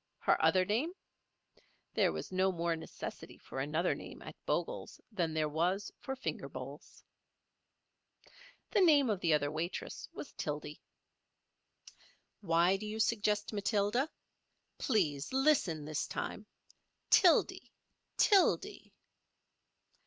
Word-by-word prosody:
Her - - +2
other 185 -1 +4
name? 240 - 0 1.0
There - - +3
was - - -6
no 190 +1 +2
more 170 -1 -1
necessity 160 - -8
for 130 - -8
another 155 +6 +1
name - - -9
at - - -9
Bogle's - - -2
than 175 -6 -1
there 155 -1 +1
was 180 +6 0
for 265 - -4
finger 265 - -4
bowls. - - -9 1.7
The 410 - +3
name 290 -9 +5
of 200 - -1
the 170 -3 +1
other 145 -1 +2
waitress 165 +3 -4
was - - -9
Tildy. - - -5 1.6
Why 175 0 +3
do 215 +2 -6
you 215 +1 -4
suggest 210 -1 +1
Matilda? 210 +6 +1 0.7
Please 155 - 0
listen 260 - +2
this 155 0 -2
time—Tildy—Tildy. 380 +2 0
195 Hz, 110 wpm, -33 LUFS, 165-230 Hz, 1.7 s, name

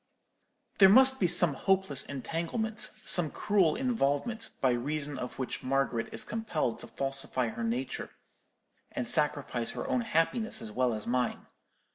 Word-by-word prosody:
"There 195 -1 +9
must 265 +5 +7
be 180 - +3
some 175 -3 +3
hopeless 190 -4 0
entanglement, 170 - -2 0.2
some 175 -4 +4
cruel 195 -3 +1
involvement, 225 - -1
by 130 - +3
reason 140 +3 -3
of 125 - -6
which 130 - -4
Margaret 130 -3 -1
is - - +1
compelled 210 - -2
to 120 - -9
falsify 135 0 -2
her 115 - -6
nature, 120 +3 -3 0.8
and 125 - -3
sacrifice 145 -6 +1
her - - -5
own 250 - +1
happiness 220 +3 0
as 110 - -7
well 125 0 0
as 105 - -7
mine. 125 0 -1
145 Hz, 145 wpm, -30 LUFS, 125-195 Hz, 0.8 s, There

